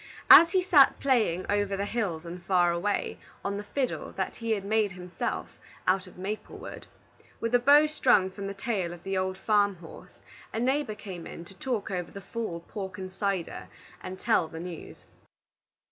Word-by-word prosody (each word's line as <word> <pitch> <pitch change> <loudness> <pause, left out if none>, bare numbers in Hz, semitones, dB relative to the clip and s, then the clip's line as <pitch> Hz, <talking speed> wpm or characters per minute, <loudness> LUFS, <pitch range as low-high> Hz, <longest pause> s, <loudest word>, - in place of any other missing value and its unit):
As 335 - +11
he 370 -1 +3
sat 300 -7 +6
playing 220 -10 +2
"Over 205 -1 0
the 200 - -1
Hills 200 -8 -2
and 175 +1 -8
Far 175 -1 +3
Away" 180 +4 -1 0.3
on 200 0 -1
the 205 - -5
fiddle 255 +5 -3
that - - -3
he 230 -1 -5
had 210 -3 +1
himself 195 -4 -1
made - - -3
out 190 0 -2
of 180 - -15
maple 200 +4 -5
wood, - - -9 0.5
with 230 +1 -2
a 245 - +6
bow 285 +5 +7
strung 245 -11 +3
from 195 +1 -6
the 200 - -5
tail 195 -5 -2
of 175 0 -12
the 195 0 -2
old 185 0 -1
farm 205 -1 +2
horse, 170 -2 -13 0.4
a 225 - -3
neighbor 260 -2 0
came 190 -5 -8
in 170 - -9
to 195 - -13
talk 225 0 -3
over 180 -2 -3
the 200 - -9
fall 200 -4 -5
pork 190 0 -7
and 185 0 -7
cider, 195 -3 -2 0.3
and 185 0 -7
tell 165 - +2
the 160 - -8
news. 175 -1 -9
195 Hz, 190 wpm, -28 LUFS, 180-225 Hz, 0.5 s, As